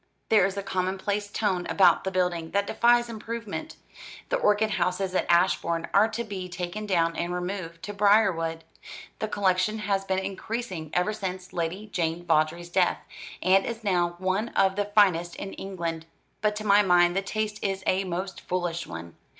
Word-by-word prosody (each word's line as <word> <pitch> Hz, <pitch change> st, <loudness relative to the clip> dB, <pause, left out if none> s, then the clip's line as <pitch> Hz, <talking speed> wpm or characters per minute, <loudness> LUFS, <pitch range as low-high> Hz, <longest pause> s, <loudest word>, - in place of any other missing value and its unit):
There 210 Hz, -3 st, +5 dB
is 195 Hz, 0 st, -6 dB
a 200 Hz, -, -2 dB
commonplace 195 Hz, +2 st, -2 dB
tone 190 Hz, -4 st, -1 dB
about 195 Hz, -, +4 dB
the -, -, +1 dB
building 180 Hz, -3 st, -1 dB
that 200 Hz, 0 st, +2 dB
defies 240 Hz, +3 st, +3 dB
improvement. 230 Hz, +5 st, -6 dB, 0.5 s
The -, -, +2 dB
orchid 215 Hz, -, +2 dB
houses 185 Hz, 0 st, 0 dB
at -, -, 0 dB
Ashbourne 170 Hz, -1 st, +2 dB
are 205 Hz, +2 st, +6 dB
to 230 Hz, +1 st, -4 dB
be 190 Hz, -4 st, -6 dB
taken 180 Hz, +4 st, -5 dB
down 165 Hz, -3 st, +1 dB
and 170 Hz, +1 st, -2 dB
removed 180 Hz, -2 st, -4 dB
to 205 Hz, -, -5 dB
Briarwood. 190 Hz, -6 st, +2 dB, 0.6 s
The 215 Hz, -, -1 dB
collection 200 Hz, 0 st, +1 dB
has 200 Hz, -2 st, -1 dB
been 190 Hz, -1 st, -1 dB
increasing 190 Hz, -3 st, -4 dB
ever 180 Hz, +4 st, +1 dB
since 185 Hz, -2 st, -5 dB
Lady 175 Hz, +5 st, -3 dB
Jane 175 Hz, -4 st, -2 dB
Vawdrey's 165 Hz, +1 st, +1 dB
death, 180 Hz, 0 st, +2 dB, 0.5 s
and 190 Hz, +2 st, +5 dB
is 230 Hz, -1 st, -5 dB
now 175 Hz, -4 st, +1 dB
one 190 Hz, +5 st, -1 dB
of 190 Hz, 0 st, +3 dB
the 205 Hz, 0 st, 0 dB
finest 190 Hz, -5 st, +3 dB
in 195 Hz, -, -6 dB
England. 170 Hz, -4 st, -5 dB, 0.3 s
But 210 Hz, 0 st, +1 dB
to 215 Hz, -, -5 dB
my 205 Hz, 0 st, +5 dB
mind 175 Hz, -2 st, +4 dB
the 195 Hz, -, +2 dB
taste 215 Hz, +1 st, -3 dB
is 195 Hz, -1 st, -1 dB
a 190 Hz, +1 st, +2 dB
most 185 Hz, +1 st, -4 dB
foolish 175 Hz, -2 st, -2 dB
one. 85 Hz, 0 st, -8 dB
190 Hz, 175 wpm, -26 LUFS, 175-205 Hz, 0.6 s, are